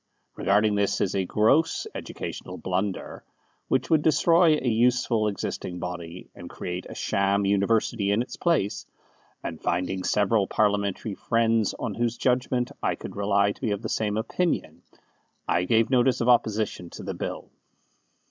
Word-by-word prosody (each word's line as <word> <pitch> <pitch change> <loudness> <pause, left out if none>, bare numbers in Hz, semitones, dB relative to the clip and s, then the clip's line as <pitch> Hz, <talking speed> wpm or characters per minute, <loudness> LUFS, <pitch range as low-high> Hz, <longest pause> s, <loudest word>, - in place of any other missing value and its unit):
Regarding 105 +2 +2
this 100 0 +1
as 95 - 0
a 95 -1 0
gross 125 - +2
educational - - -6
blunder, 95 +1 -3 0.4
which - - 0
would 160 -2 +5
destroy 160 +1 +4
a 135 - -3
useful 120 -1 +2
existing 95 -3 -4
body, 90 0 -6
and 85 - -10
create 90 0 -5
a - - -8
sham 100 0 +1
university 100 +1 +1
in 105 +4 +2
its - - -9
place, 160 - 0 0.6
and 80 - -6
finding 90 +2 -1
several 105 0 +2
Parliamentary 105 0 0
friends 115 0 +1
on 115 - -3
whose 120 +2 -1
judgment 125 -1 0
I - - 0
could - - -9
rely 100 0 +2
to - - -12
be 120 - 0
of 100 +1 -2
the 110 - -3
same 105 -1 -1
opinion, 165 +10 -2 0.7
I 90 - +1
gave 115 +5 +2
notice 125 0 +3
of 120 - 0
opposition 110 -6 +1
to - - -9
the - - -4
Bill. - - -6
105 Hz, 155 wpm, -26 LUFS, 100-120 Hz, 0.7 s, would